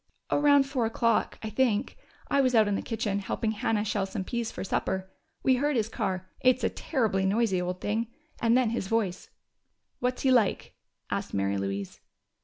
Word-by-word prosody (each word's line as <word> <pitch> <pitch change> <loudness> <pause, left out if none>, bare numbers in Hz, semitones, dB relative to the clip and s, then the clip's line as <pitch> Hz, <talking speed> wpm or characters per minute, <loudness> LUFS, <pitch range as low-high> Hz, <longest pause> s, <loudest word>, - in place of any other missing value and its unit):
"Around 285 -1 +5
four 265 -4 -1
o'clock, 230 0 +1
I 220 - -4
think. 230 0 +1 0.3
I 280 - +3
was 255 -2 +2
out 220 -2 +5
in 205 - +1
the - - -1
kitchen, 215 -3 -2
helping 215 +2 -2
Hannah 215 0 0
shell 205 -2 -1
some 190 0 -4
peas 235 +2 -2
for - - -6
supper. 190 0 -2 0.3
We 260 -1 +4
heard 290 +2 +1
his 220 -2 +1
car 185 -4 -2
it's 255 0 +3
a - - +3
terribly 220 - 0
noisy 195 -1 +2
old 180 0 -3
thing 225 +3 -1 0.3
and 235 +1 +4
then 250 -4 +2
his 230 -5 -2
voice." 200 -4 -1 0.7
"What's 250 +1 -1
he 265 - +4
like?" 235 -6 +2 0.4
asked - - -2
Mary 100 0 0
Louise. 100 0 -4
220 Hz, 185 wpm, -28 LUFS, 190-245 Hz, 0.7 s, Around